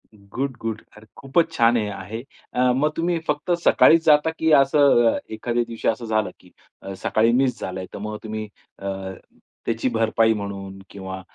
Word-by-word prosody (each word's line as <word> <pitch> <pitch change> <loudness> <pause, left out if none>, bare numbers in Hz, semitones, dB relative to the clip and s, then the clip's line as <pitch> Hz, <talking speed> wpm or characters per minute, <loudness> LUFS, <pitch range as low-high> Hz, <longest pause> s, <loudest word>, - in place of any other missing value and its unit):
Good, 120 +7 -5
good. 110 -1 -3 0.2
अरे, 105 - -15
खूपच 160 +5 +1
छान 120 -5 +3
हे 105 -2 -1
आहे. 100 +4 -7 0.5
मग 150 +4 +2
तुम्ही 170 +1 0
फक्त 150 +3 -1
सकाळीच 165 0 +5
जाता 150 0 +5
की 160 0 +2
असं 135 -4 +4
अ, - - -2
एखाद्या 120 +2 -1
दिवशी 115 -1 -5
असं 115 +1 0
झालं 110 -1 0
की 90 - -21 0.3
अ, 95 - -7
सकाळी 115 +2 +3
मिस 130 -2 0
झालंय, 95 0 -4
तर - - -6
मग 105 +1 -5
तुम्ही 110 0 -5 0.3
अ, 100 - -6 0.8
त्याची 115 +2 0
भरपाई 115 -1 +2
म्हणून 100 -2 -6
किंवा 95 -1 -7
115 Hz, 170 wpm, -23 LUFS, 105-135 Hz, 0.8 s, सकाळीच